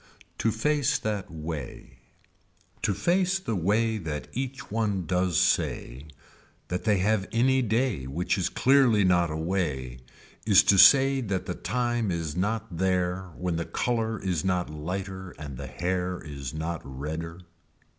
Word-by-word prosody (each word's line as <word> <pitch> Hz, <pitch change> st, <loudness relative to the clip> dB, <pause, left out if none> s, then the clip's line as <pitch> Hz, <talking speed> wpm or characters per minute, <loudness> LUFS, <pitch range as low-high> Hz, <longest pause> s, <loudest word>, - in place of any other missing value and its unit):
To 115 Hz, -, +2 dB
face 145 Hz, +4 st, +1 dB
that 105 Hz, -3 st, -3 dB
way. 75 Hz, -6 st, -7 dB, 0.8 s
To 100 Hz, -, 0 dB
face 185 Hz, -, +2 dB
the 115 Hz, -, -3 dB
way 110 Hz, +5 st, +1 dB
that 80 Hz, -5 st, -5 dB
each 130 Hz, 0 st, -5 dB
one 105 Hz, -5 st, 0 dB
does 90 Hz, -1 st, +1 dB
say 65 Hz, +5 st, 0 dB, 0.6 s
that 90 Hz, +3 st, -3 dB
they 105 Hz, -2 st, +3 dB
have 100 Hz, +1 st, +1 dB
any 130 Hz, +3 st, +3 dB
day 110 Hz, -, 0 dB
which 90 Hz, +6 st, -1 dB
is 95 Hz, -3 st, 0 dB
clearly 130 Hz, -6 st, +4 dB
not 90 Hz, -2 st, +3 dB
away 75 Hz, -7 st, -2 dB, 0.4 s
is 100 Hz, -2 st, +6 dB
to 100 Hz, 0 st, +4 dB
say 135 Hz, +2 st, +7 dB
that 100 Hz, -5 st, -2 dB
the 90 Hz, -, -3 dB
time 120 Hz, +4 st, -1 dB
is 80 Hz, -3 st, -3 dB
not 105 Hz, 0 st, -2 dB
there 90 Hz, 0 st, 0 dB
when 90 Hz, -2 st, -2 dB
the 85 Hz, -, -2 dB
color 115 Hz, -3 st, -1 dB
is 90 Hz, -5 st, -1 dB
not 90 Hz, -3 st, 0 dB
lighter 95 Hz, +4 st, -5 dB
and 75 Hz, -2 st, -7 dB
the -, -, -7 dB
hair 90 Hz, +1 st, -2 dB
is 70 Hz, -4 st, -7 dB
not 80 Hz, +2 st, -4 dB
redder. 80 Hz, +6 st, -6 dB
95 Hz, 145 wpm, -27 LUFS, 80-110 Hz, 0.8 s, say